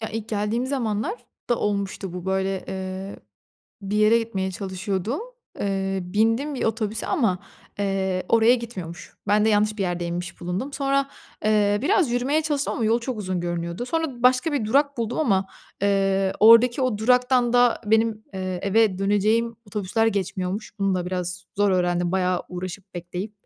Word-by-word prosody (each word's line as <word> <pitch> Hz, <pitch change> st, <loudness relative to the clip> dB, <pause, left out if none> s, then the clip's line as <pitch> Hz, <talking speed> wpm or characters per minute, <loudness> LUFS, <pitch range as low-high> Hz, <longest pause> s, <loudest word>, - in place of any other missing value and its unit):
Ya, 220 Hz, -, -4 dB
ilk 225 Hz, 0 st, -5 dB
geldiğim 215 Hz, +3 st, -1 dB
zamanlarda 240 Hz, -, -3 dB
olmuştu 200 Hz, -2 st, -2 dB
bu 180 Hz, 0 st, -6 dB
böyle, 190 Hz, 0 st, -1 dB
eee, 190 Hz, +1 st, -5 dB, 0.7 s
bir 200 Hz, +1 st, -2 dB
yere 215 Hz, +2 st, +5 dB
gitmeye 195 Hz, -5 st, -2 dB
çalışıyordum. 190 Hz, -, -3 dB, 0.4 s
Eee, 195 Hz, -1 st, -1 dB
bindim 225 Hz, +10 st, +1 dB
bir 260 Hz, -, -2 dB
otobüse 220 Hz, -1 st, -1 dB
ama, 225 Hz, -, +1 dB, 0.4 s
eee, 190 Hz, -2 st, -1 dB
oraya 230 Hz, +1 st, +5 dB
gitmiyormuş. 190 Hz, -9 st, -7 dB
Ben 210 Hz, +1 st, +4 dB
de 220 Hz, -, +3 dB
yanlış 210 Hz, 0 st, +2 dB
bir -, -, 0 dB
yerde 175 Hz, -2 st, -2 dB
inmiş 175 Hz, +1 st, -5 dB
bulundum. 185 Hz, +11 st, -3 dB
Sonra, 275 Hz, 0 st, +1 dB, 0.4 s
eee, 205 Hz, -1 st, +3 dB
biraz 340 Hz, -, +3 dB
yürümeye 265 Hz, +6 st, +1 dB
çalıştım 295 Hz, -2 st, -1 dB
ama 230 Hz, -, -1 dB
yol 230 Hz, +2 st, +2 dB
çok 235 Hz, -1 st, -4 dB
uzun 185 Hz, -3 st, -2 dB
görünüyordu. 175 Hz, +5 st, -3 dB
Sonra 315 Hz, -7 st, -2 dB
başka 255 Hz, +5 st, +4 dB
bir 280 Hz, -6 st, 0 dB
durak 280 Hz, +5 st, +2 dB
buldum 230 Hz, +1 st, -2 dB
ama, 195 Hz, -11 st, +2 dB, 0.4 s
eee, 195 Hz, -1 st, +2 dB
oradaki 230 Hz, +4 st, +7 dB
o 250 Hz, -5 st, 0 dB
duraktan 250 Hz, +1 st, +3 dB
da 245 Hz, -1 st, +4 dB
benim, 220 Hz, 0 st, +2 dB
eee, 185 Hz, -1 st, -3 dB
eve 200 Hz, -1 st, +3 dB
döneceğim 215 Hz, +4 st, +1 dB
otobüsler 210 Hz, +2 st, 0 dB
geçmiyormuş. 195 Hz, 0 st, -2 dB
Bunu 195 Hz, -1 st, +1 dB
da 180 Hz, -1 st, -2 dB
biraz 180 Hz, 0 st, -4 dB
zor 205 Hz, 0 st, +3 dB
öğrendim 175 Hz, -1 st, +1 dB
bayağı 185 Hz, -1 st, +1 dB
uğraşıp 185 Hz, +1 st, -7 dB
bekleyip. 180 Hz, +4 st, -5 dB
210 Hz, 160 wpm, -24 LUFS, 190-235 Hz, 0.7 s, oradaki